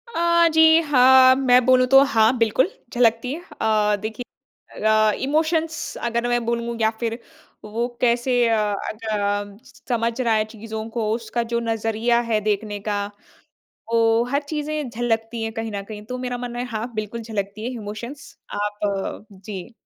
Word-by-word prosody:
अ, 340 0 +4
जी, 320 0 +7
हाँ, 260 -3 +6
मैं 250 -2 +4
बोलूँ 255 0 +5
तो 270 +1 +7
हाँ, 230 -2 +3
बिल्कुल, 230 - +2 0.2
झलकती 235 0 +2
है। 335 - -6 0.2
अ, 210 -1 +2
देखिए 220 +3 -5 0.6
अ, 215 0 +4
इमोशंस 315 +2 -1
अगर 235 0 -1
मैं 240 0 +1
बोलूँ 235 0 -2
या 220 - +4
फ़िर 230 -1 -2 0.5
वो 225 +3 -2
कैसे 245 +1 +2
अ, 225 - +2 0.3
अग 215 +1 -9
अ, 205 -1 -2 0.3
समझ 230 0 0
रहा 230 -2 +2
है 215 0 +2
चीज़ों 220 0 -7
को, 225 -2 -2
उसका 230 +1 -2
जो 235 - +2
नज़रिया 225 +1 0
है 215 - +3
देखने 210 0 -2
का, 205 0 -2 0.9
वो 230 0 +3
हर 280 +2 0
चीज़ें 300 -2 -3
झलकती 225 -1 -2
है 225 - -2
कहीं 225 -1 -5
न 200 - -4
कहीं। 210 0 -9
तो 250 +3 -6
मेरा 250 -1 -4
मानना 240 0 -5
है, 245 - -2
हाँ, 235 0 -5
बिल्कुल 215 +2 -4
झलकती 215 -1 -5
है 245 - -2
इमोशंस। 235 +7 -8 0.3
आप 205 -1 -3
जी। 195 +2 -9
230 Hz, 165 wpm, -22 LUFS, 215-250 Hz, 0.9 s, जी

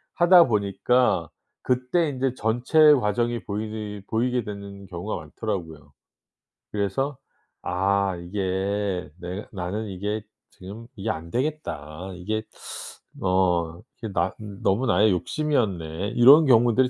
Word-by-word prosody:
하다 175 0 +7
보니까 105 - +1 0.3
그때 130 +6 +1
인제 130 -2 -1
전체 125 +8 +4
과정이 120 0 0
보이는 105 0 -4
보이게 125 +2 +1
되는 100 -1 -8
경우가 90 +3 -4
많더라고요. 80 - -6 0.8
그래서 115 +7 -1 0.4
'아 95 +1 0
이게 95 0 -2
내 90 +4 -5
나는 100 +4 -3
이게 105 +3 -3 0.3
지금 105 +5 -10
이게 105 +3 -3
안 85 -4 -4
되겠다. 95 - -3
이게 110 +5 -3 0.8
어 90 -3 +1 0.2
이게 110 - -4
나 85 +1 0 0.3
너무 100 +7 +2
나의 105 +1 +4
욕심이었네.' 95 - -1
이런 140 +6 +8
경우들이 120 0 +4
105 Hz, 250 characters per minute, -25 LUFS, 95-120 Hz, 0.8 s, 이런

